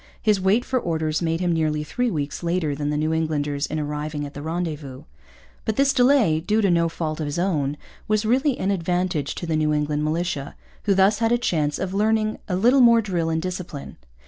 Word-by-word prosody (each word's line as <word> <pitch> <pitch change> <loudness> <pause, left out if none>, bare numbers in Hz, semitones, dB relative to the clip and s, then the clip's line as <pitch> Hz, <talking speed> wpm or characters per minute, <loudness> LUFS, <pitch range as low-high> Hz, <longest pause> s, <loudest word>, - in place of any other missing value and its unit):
His 210 -4 +2
wait 205 +6 +2
for 260 -1 0
orders 160 -5 -1
made 165 0 -1
him 175 -1 +1
nearly 155 -2 0
three 245 - -1
weeks 150 -7 -3
later 170 -3 0
than 145 +1 -3
the 150 - -1
New 155 +1 0
Englanders 150 -2 -1
in 155 - -3
arriving 150 0 -3
at 140 - -9
the 145 - -7
rendezvous. 155 -4 -4 0.6
But 220 - -1
this 275 +2 +3
delay, 245 - +4
due 210 +7 0
to 200 -3 +3
no 170 -1 +2
fault 160 -1 -4
of 155 - -2
his 145 +3 -3
own, 150 -6 0 0.3
was 215 0 +1
really 260 +4 +2
an 195 - 0
advantage 175 -4 -1
to - - -5
the 165 -1 -1
New 155 -1 +1
England 150 0 -1
militia, 155 -2 -2 0.3
who 200 -2 +3
thus 195 +3 +4
had 225 0 +1
a 240 - +4
chance 155 -11 0
of 190 0 -3
learning 215 +1 +1
a 180 - 0
little 245 +8 +4
more 235 -1 +6
drill 175 -5 -1
and 160 0 0
discipline. 180 -6 -6
170 Hz, 215 wpm, -23 LUFS, 150-205 Hz, 0.6 s, more